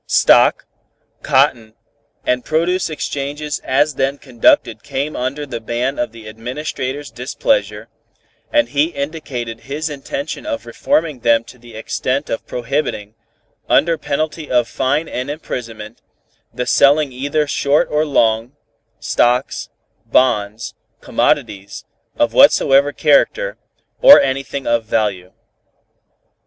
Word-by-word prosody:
Stock, -, -, +4 dB, 0.6 s
cotton 125 Hz, -5 st, +1 dB, 0.5 s
and 125 Hz, 0 st, 0 dB
produce 170 Hz, +4 st, 0 dB
exchanges 145 Hz, 0 st, -4 dB
as 145 Hz, +3 st, +1 dB
then 135 Hz, +1 st, -1 dB
conducted 115 Hz, -3 st, +2 dB
came 140 Hz, +3 st, -4 dB
under 135 Hz, +4 st, -3 dB
the 120 Hz, -4 st, -6 dB
ban 120 Hz, +4 st, -2 dB
of 120 Hz, -, -1 dB
the 115 Hz, -1 st, -13 dB
Administrator's 130 Hz, +5 st, -5 dB
displeasure, -, -, -1 dB, 0.6 s
and 295 Hz, -4 st, +2 dB
he 145 Hz, +1 st, +2 dB
indicated 140 Hz, -7 st, -5 dB
his 150 Hz, +5 st, -4 dB
intention 140 Hz, +1 st, -5 dB
of 115 Hz, -, -4 dB
reforming 150 Hz, +4 st, -1 dB
them 115 Hz, -1 st, +3 dB
to 125 Hz, -, -15 dB
the 120 Hz, -1 st, -14 dB
extent 130 Hz, +5 st, -2 dB
of 115 Hz, -, -4 dB
prohibiting, 120 Hz, -4 st, -3 dB, 0.6 s
under 165 Hz, +4 st, +3 dB
penalty 155 Hz, +1 st, -3 dB
of 120 Hz, -2 st, +2 dB
fine 145 Hz, +5 st, -1 dB
and 125 Hz, +3 st, -4 dB
imprisonment, 115 Hz, -7 st, -7 dB, 0.5 s
the 125 Hz, -, -3 dB
selling 140 Hz, +2 st, +4 dB
either 145 Hz, +4 st, -1 dB
short 145 Hz, 0 st, +1 dB
or 150 Hz, +1 st, +2 dB
long, 115 Hz, -4 st, +1 dB, 0.5 s
stocks, 125 Hz, +2 st, 0 dB, 0.4 s
bonds, 110 Hz, -4 st, +1 dB, 0.3 s
commodities 100 Hz, 0 st, -1 dB, 0.3 s
of -, -, +1 dB
whatsoever 140 Hz, +1 st, +5 dB
character, -, -, +2 dB, 0.5 s
or 285 Hz, -, +10 dB
anything 135 Hz, 0 st, -2 dB
of 115 Hz, -1 st, +1 dB
value. 100 Hz, -5 st, -1 dB
135 Hz, 115 wpm, -18 LUFS, 115-150 Hz, 0.6 s, or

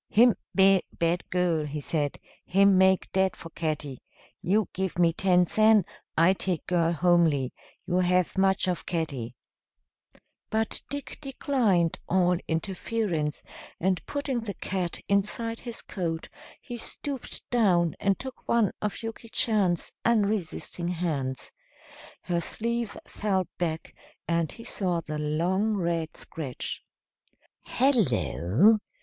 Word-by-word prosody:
"Him 235 Hz, +2 st, +6 dB, 0.2 s
ve'y 195 Hz, -1 st, +6 dB, 0.2 s
bad 170 Hz, +1 st, 0 dB
girl," 175 Hz, -3 st, +1 dB
he 150 Hz, +1 st, -4 dB
said; 145 Hz, 0 st, -1 dB, 0.3 s
"him 195 Hz, +1 st, +4 dB
make 190 Hz, 0 st, +3 dB
dead 190 Hz, -1 st, +2 dB
for 165 Hz, -, -10 dB
catty. 150 Hz, -5 st, -3 dB, 0.4 s
You 205 Hz, +1 st, +2 dB
give 190 Hz, -1 st, -2 dB
me 170 Hz, -2 st, +4 dB
ten 180 Hz, 0 st, +3 dB
sen, 215 Hz, 0 st, +5 dB, 0.3 s
I 170 Hz, +4 st, +6 dB
take 185 Hz, -4 st, -2 dB
girl 170 Hz, -2 st, +2 dB
homely. 165 Hz, -6 st, +3 dB, 0.3 s
You 180 Hz, -, 0 dB
have 180 Hz, -1 st, +2 dB
much 190 Hz, -1 st, +2 dB
of 180 Hz, -1 st, -2 dB
catty." 140 Hz, -9 st, -3 dB, 1.1 s
But 220 Hz, 0 st, 0 dB
Dick 285 Hz, 0 st, -6 dB
declined 245 Hz, -, +1 dB
all 180 Hz, -1 st, +3 dB
interference, 170 Hz, -2 st, -2 dB, 0.4 s
and 185 Hz, +1 st, 0 dB
putting 285 Hz, -3 st, -2 dB
the 210 Hz, -4 st, -5 dB
cat 180 Hz, -2 st, -3 dB
inside 220 Hz, +3 st, +1 dB
his 235 Hz, -2 st, -5 dB
coat 170 Hz, -4 st, -4 dB, 0.3 s
he 240 Hz, -, -7 dB
stooped 270 Hz, +2 st, -5 dB
down 180 Hz, -9 st, +3 dB
and 195 Hz, -1 st, +2 dB
took 260 Hz, -1 st, -9 dB
one 230 Hz, -5 st, +3 dB
of 210 Hz, +2 st, -3 dB
Yuki 225 Hz, 0 st, -7 dB
Chan's 200 Hz, -8 st, +1 dB
unresisting 205 Hz, -6 st, 0 dB
hands. 150 Hz, -7 st, -2 dB, 0.7 s
Her 170 Hz, -1 st, 0 dB
sleeve 235 Hz, +4 st, -2 dB
fell 190 Hz, -4 st, -1 dB
back, 160 Hz, -2 st, -3 dB, 0.3 s
and 170 Hz, -2 st, +1 dB
he 230 Hz, -, -10 dB
saw 180 Hz, -6 st, -1 dB
the 155 Hz, -1 st, -5 dB
long 180 Hz, +8 st, +1 dB
red 170 Hz, -3 st, -2 dB
scratch. 140 Hz, -6 st, -4 dB, 0.8 s
"Hello! 210 Hz, -, +3 dB
180 Hz, 125 wpm, -27 LUFS, 165-215 Hz, 1.1 s, Him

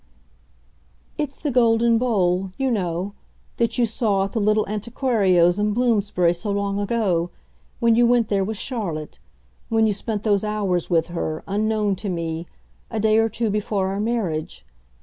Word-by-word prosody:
"It's 295 Hz, -2 st, -3 dB
the 295 Hz, -, -2 dB
golden 230 Hz, -1 st, +3 dB
bowl, 190 Hz, -6 st, +1 dB
you 270 Hz, -1 st, 0 dB
know, 185 Hz, -2 st, -2 dB, 0.4 s
that 235 Hz, +1 st, 0 dB
you 245 Hz, -, +4 dB
saw 215 Hz, -4 st, +1 dB
at 195 Hz, -, -3 dB
the 225 Hz, -, -1 dB
little 215 Hz, +1 st, +2 dB
antiquario's 205 Hz, -5 st, +2 dB
in 210 Hz, 0 st, +1 dB
Bloomsbury, 205 Hz, -8 st, +2 dB
so 175 Hz, +4 st, -5 dB
long 200 Hz, 0 st, -1 dB
ago 200 Hz, -5 st, 0 dB, 0.5 s
when 230 Hz, -1 st, +4 dB
you 235 Hz, +1 st, +4 dB
went 240 Hz, -2 st, +3 dB
there 200 Hz, -2 st, +1 dB
with 215 Hz, +2 st, -3 dB
Charlotte, 190 Hz, -, -4 dB, 0.5 s
when 225 Hz, -1 st, +3 dB
you 215 Hz, -, +2 dB
spent 210 Hz, +1 st, -3 dB
those 205 Hz, -2 st, +2 dB
hours 205 Hz, -5 st, -1 dB
with 165 Hz, -1 st, +1 dB
her, 160 Hz, -2 st, -3 dB
unknown 210 Hz, 0 st, 0 dB
to 205 Hz, +1 st, -4 dB
me, 165 Hz, -1 st, -3 dB, 0.4 s
a 225 Hz, -, -3 dB
day 215 Hz, +1 st, +3 dB
or 225 Hz, 0 st, +2 dB
two 225 Hz, 0 st, -1 dB
before 200 Hz, -2 st, -1 dB
our 195 Hz, +1 st, -3 dB
marriage. 205 Hz, -, -2 dB
210 Hz, 165 wpm, -22 LUFS, 185-225 Hz, 0.5 s, you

